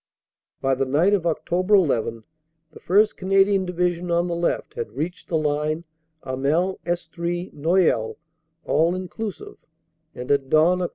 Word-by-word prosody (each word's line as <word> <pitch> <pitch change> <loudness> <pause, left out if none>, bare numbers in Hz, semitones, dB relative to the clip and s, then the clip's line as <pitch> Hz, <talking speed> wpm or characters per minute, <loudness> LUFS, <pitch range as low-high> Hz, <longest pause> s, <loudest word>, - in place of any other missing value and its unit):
"By 135 0 +2
the 135 0 -1
night 160 +9 +3
of 190 -4 +1
Oct. 165 -2 -2
1 185 +1 +4
1 115 -3 -2 0.5
the - - -13
1st 210 +4 +3
Canadian 195 0 +3
Division, 180 0 -1
on 170 +1 +1
the 175 - -2
left, 170 0 -1
had 465 -1 -5
reached 175 +3 -4
the 165 - 0
line 155 +1 -1 0.4
Hamel 150 +9 0
Estrees 175 +1 -3
Noyelles 150 -7 +1 0.5
(all 165 +2 +2
inclu 185 +4 -4
sive), - - -13 0.6
and 125 +2 -4
at 140 -2 +1
dawn, 165 +5 +4
Oct. 180 - -1
170 Hz, 155 wpm, -23 LUFS, 150-185 Hz, 0.6 s, 1